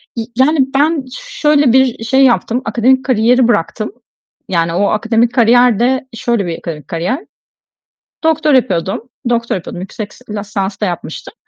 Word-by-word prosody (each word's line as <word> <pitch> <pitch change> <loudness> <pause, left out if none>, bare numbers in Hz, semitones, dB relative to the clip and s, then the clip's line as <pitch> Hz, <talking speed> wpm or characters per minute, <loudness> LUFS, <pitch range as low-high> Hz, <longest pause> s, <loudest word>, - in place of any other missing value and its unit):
Y 230 - -3
yani 285 +5 +3 0.2
ben 295 0 +2
şöyle 295 - +1
bir 265 0 +6
i 225 - -6
şey 265 +4 +3
yaptım, 245 0 +2
akademik 260 +3 +2
kariyeri 245 0 +3
bıraktım. 215 0 -1 0.6
Yani 165 -2 0
o 200 +4 +1
akademik 225 +3 +1
kariyer 245 -1 +4
de 260 +2 +1
şöyle 230 -3 -1
bir 170 -2 -5
kari 155 -3 -6
kariyer. 175 - -3 1.0
Doktora 315 -2 +3
yapıyordum. 195 +1 -2 0.2
Doktora 235 -3 0
yapıyordum. 175 0 -8
Yüksek 205 +2 -7
s - - -19
lisans 205 -1 -4
da - - +2
yapmıştım 175 - -6
235 Hz, 150 wpm, -15 LUFS, 200-260 Hz, 1.0 s, bir